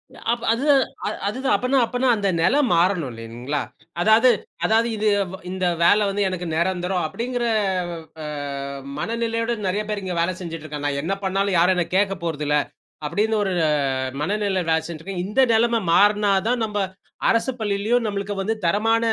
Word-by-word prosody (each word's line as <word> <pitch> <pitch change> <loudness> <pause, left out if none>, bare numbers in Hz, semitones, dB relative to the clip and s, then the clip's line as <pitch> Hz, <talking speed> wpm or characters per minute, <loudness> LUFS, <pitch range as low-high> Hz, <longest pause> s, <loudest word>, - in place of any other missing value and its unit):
ஆ, - - -13
அப்ப 235 0 -2
அது 245 +5 -2 0.4
அ - - +1 0.2
அதுதான். 260 +6 +1
அப்பன்னா 255 +2 +1
அப்பன்னா 250 +3 -1
அந்த 200 -2 0
நிலை 245 - +3 0.2
மாறணும் 170 -5 +2
இல்லைங்களா? 120 +5 -4 0.4
அதாவது 220 +6 +5 0.4
அதாவது 225 +1 +3
இது 215 +1 0 0.4
இந்த 185 0 -2 0.2
வேலை 205 +5 +5
வந்து 200 +1 0
எனக்கு 180 -1 -4
நிரந்தரம் 180 +1 0
அப்படிங்கிற 245 +7 -3 0.8
அ - - -5 0.7
மனநிலையோடு 230 +2 -1
நிறைய 205 +3 0
பேரு 210 -2 -3
இங்க 185 -2 -3
வேலை 180 +2 0
செஞ்சிட்டு 165 -3 -6
இருக்கான். 150 -1 -5
நான் 140 -1 -1
என்ன 180 +5 -1
பண்ணாலும் 195 0 +1
யாரும் 180 +2 +4
என்னை 175 -2 0
கேட்கப்போறது 170 -6 -1
இல்ல. 150 0 +3 0.5
அப்படின்னு 215 +8 0
ஒரு 190 -2 -1 0.2
அ - - +2 0.5
மனநிலை 200 +1 0
வேலை 160 0 +3
செஞ்சிட்டு 165 -2 -7
இருக்கேன். 185 -2 -4
இந்த 210 +6 +1
நிலைமை 230 +1 +3
மாறுனா 205 +2 +4 0.2
தான் 245 -1 +1
நம்ம 210 -1 -4 0.5
அரசுப் 245 +2 0
பள்ளியிலும் 215 +4 +1
நம்மளுக்கு 200 0 -3
வந்து 220 +3 -1
தரமான 225 +6 +2
200 Hz, 165 wpm, -22 LUFS, 175-225 Hz, 0.8 s, அதாவது